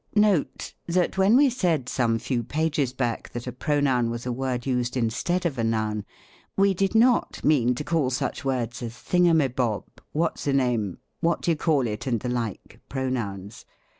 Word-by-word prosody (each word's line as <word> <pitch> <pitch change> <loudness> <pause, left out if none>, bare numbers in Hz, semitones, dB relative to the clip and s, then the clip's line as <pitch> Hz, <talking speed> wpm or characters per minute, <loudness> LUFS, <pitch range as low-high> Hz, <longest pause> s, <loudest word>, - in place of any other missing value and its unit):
Note. 210 -7 +2
— - - -48
That 180 - +2
when 200 +5 +6
we 280 -1 +5
said, 170 - 0
some 115 -3 +1
few 120 +1 -1
pages 150 -1 0
back, 120 -3 -2
that 120 0 -5
a 125 - -4
pronoun 130 -3 +1
was 115 +1 -5
a 125 - -1
word 125 -1 -2
used 125 -1 -1
instead 125 +10 0
of 140 -7 -1
a - - +1
noun, 110 -2 -1 0.5
v/e 195 0 +4
did 195 +3 0
not 240 +2 +3
mean 125 -5 +3
to 150 - -4
call 150 -3 +1
such 130 - -2
words 125 -3 -2
as 120 -1 -5
thingumibob, 130 - +2 0.3
what 165 +2 0
siname, 125 -9 0 0.2
what 170 0 0
d'ye 170 - +3
call 150 -4 +1
it, 110 +3 -4
and 120 -4 0
the 125 - -3
like, 115 -5 -4
pronouns. 115 -5 -3
130 Hz, 175 wpm, -25 LUFS, 120-160 Hz, 0.5 s, when